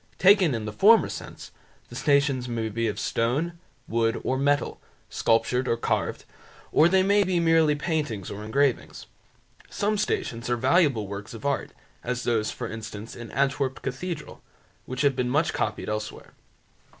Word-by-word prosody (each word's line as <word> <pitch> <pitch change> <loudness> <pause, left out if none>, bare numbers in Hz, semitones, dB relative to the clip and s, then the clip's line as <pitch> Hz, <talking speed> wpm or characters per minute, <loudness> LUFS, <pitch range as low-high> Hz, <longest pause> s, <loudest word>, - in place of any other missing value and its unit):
Taken 185 - +5
in 110 -2 -4
the 105 - -5
former 220 - +5
sense, - - -8 0.4
the - - -10
Stations 140 -4 +2
may 115 -2 -2
be 115 +2 -1
of 105 - -3
stone, 150 +9 -1 0.3
wood, 115 0 0
or 130 - 0
metal, 145 +2 0 0.3
sculptured 125 +3 +1
or 115 - +1
carved, - - -2 0.5
or 160 +3 +5
they 190 +1 +4
may 200 +1 +4
be 185 -2 0
merely 165 -2 +4
paintings 145 - -2
or 105 +1 -6
engravings. 135 +4 0 0.6
Some 210 0 -1
Stations 120 - -2
are 120 - +1
valuable 140 - +3
works 100 +3 -7
of 110 - -10
art, 140 -1 -1 0.3
as 125 0 -3
those, 110 -2 0
for - - -5
instance, 110 0 -8
in 120 -1 -9
Antwerp 135 0 -1
cathedral, 150 +4 -5 0.5
which 130 0 -3
have 140 -2 +3
been 125 -1 -1
much 150 +5 +1
copied 105 -1 -2
elsewhere. 105 0 -5
130 Hz, 160 wpm, -26 LUFS, 115-160 Hz, 0.6 s, Taken